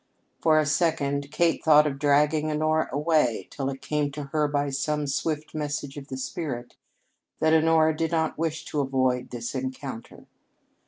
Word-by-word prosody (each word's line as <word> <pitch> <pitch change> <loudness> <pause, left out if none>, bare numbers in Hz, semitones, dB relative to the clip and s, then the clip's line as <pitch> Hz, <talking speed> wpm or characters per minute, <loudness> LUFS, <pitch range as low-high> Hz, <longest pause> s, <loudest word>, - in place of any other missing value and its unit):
For 155 -1 +4
a 155 - +3
second 145 -2 0
Kate 170 +1 +1
thought 150 -1 +6
of 140 -2 -2
dragging 150 +2 +3
Honora 155 +1 +1
away, 145 - +1
till 135 -1 -3
it 135 0 -7
came 150 -1 0
to 150 +1 -5
her 150 -1 +2
by 145 -1 -1
some 150 +2 -1
swift 150 +2 -2
message 145 -2 -3
of 140 -1 -8
the 130 - -6
spirit 130 -3 -5 0.6
that 160 0 +3
Honora 160 0 +4
did 165 +1 -1
not 160 -1 0
wish 160 0 -3
to 150 - -3
avoid 130 -2 0
this 120 -1 -5
encounter. 130 -2 -6
150 Hz, 165 wpm, -26 LUFS, 135-155 Hz, 0.6 s, thought